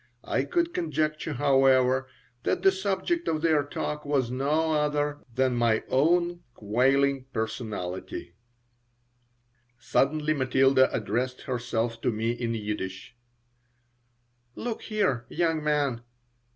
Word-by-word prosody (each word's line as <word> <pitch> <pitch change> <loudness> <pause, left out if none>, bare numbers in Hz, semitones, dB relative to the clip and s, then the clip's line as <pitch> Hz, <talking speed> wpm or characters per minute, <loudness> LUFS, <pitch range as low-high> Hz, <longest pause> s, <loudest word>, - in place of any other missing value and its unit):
I - - 0
could 345 -1 0
conjecture, 155 -1 -1
however, 130 -1 +3 0.3
that - - -1
the 195 - +7
subject 195 - -1
of 155 0 -1
their 155 -3 +3
talk 150 +1 -4
was 135 -4 0
no 150 +5 +1
other 150 -1 0 0.2
than 130 -1 +2
my 115 -2 +2
own 175 +5 +2
quailing 135 +5 +2
personality 110 -7 -4 1.4
Suddenly 150 +5 +1
Matilda 130 -1 +3
addressed 120 +4 -2
herself 120 -2 -2
to 125 - +1
me 110 +1 -1
in 120 -1 -2
Yiddish: 105 -1 -5 1.4
"Look 235 -2 -4
here, 195 - -1
young 165 -3 0
man! 145 -5 0
135 Hz, 110 wpm, -27 LUFS, 120-155 Hz, 1.4 s, the